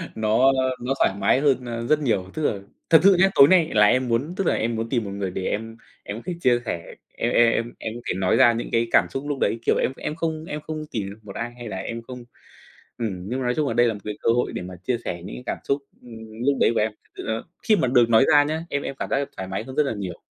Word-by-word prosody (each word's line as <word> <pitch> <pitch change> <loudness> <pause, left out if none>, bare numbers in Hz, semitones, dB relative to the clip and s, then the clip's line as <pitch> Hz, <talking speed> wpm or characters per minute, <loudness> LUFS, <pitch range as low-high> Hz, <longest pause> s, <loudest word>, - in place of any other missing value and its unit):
nó 110 +5 +3 0.3
nó 125 +2 -1
thoải - - +3
mái 125 - +3
hơn, 135 -3 +2
a, 115 -1 -4
rất 150 +6 +2
nhiều. 110 -10 0
Tức 155 - -4
là 105 -8 0 0.3
thật 160 - +8
sự 195 0 +7
nhá, 190 +2 +6
tối 140 - +9
nay 170 -2 +4
là 105 -1 +6
em 130 +4 +3
muốn 125 +8 -1
tức 190 -2 -1
là - - +3
em 115 +1 -1
muốn 115 +1 -3
tìm 120 -2 0
một 100 - -6
người 100 -2 -3
để 95 - -4
em 115 +1 -3 0.3
em 105 +3 -6
thích 175 -2 -5
chia 125 -4 +3
sẻ, 85 -6 -5 0.2
em - - -1
em 120 -1 +5
em 115 +1 -2
em 110 - -4
thể - - 0
nói 95 -1 +2
ra 120 -3 +6
những 115 - -4
cái 115 0 +1
cảm - - +5
xúc 135 - -4
lúc 145 -2 -2
đấy, 115 - +1
kiểu, - - +3
em - - +1
em 150 - -4
không 160 -1 -3
em 150 -2 -5
không 155 0 -6
tìm 100 -4 -3
được 100 +2 -11
một 100 -2 -10
ai 120 +1 -4
hay 120 -1 -8
là 95 - -5
em 115 +5 -5
không 125 +1 -9 0.7
ừm, 95 -5 -4
nhưng 125 +2 -2
mà 130 - -3
nói 125 - +1
chung 150 -2 0
là 115 - -1
đây 120 +1 +4
là 115 - 0
một 105 - -8
cái 105 -1 -5
cơ - - +1
hội 125 - 0
để - - -4
mà 90 +1 -8
chia 125 +2 0
sẻ 85 -1 -4
những - - -7
cái 125 - -9
cảm - - -2
xúc, 140 +1 -1 0.2
ưm, 110 -1 -10
lúc 140 -1 +2
đấy - - +4
của - - +1
em. 110 +1 +1
Thực 105 - -33
sự - - -6
là 110 0 -2 0.2
khi 215 - +4
mà 130 - +1
được 120 -2 +4
nói 115 +3 +5
ra 145 0 +7
nhá, 155 +3 -3
em 145 - -1
em 135 - -5
cảm - - -3
giác 135 - +1
được 140 0 -3
thoải 95 - -5
mái 95 +3 -3
hơn 130 +2 -9
rất 150 - +4
là 140 - -2
nhiều. 95 -5 -6
120 Hz, 305 wpm, -23 LUFS, 110-140 Hz, 0.7 s, tối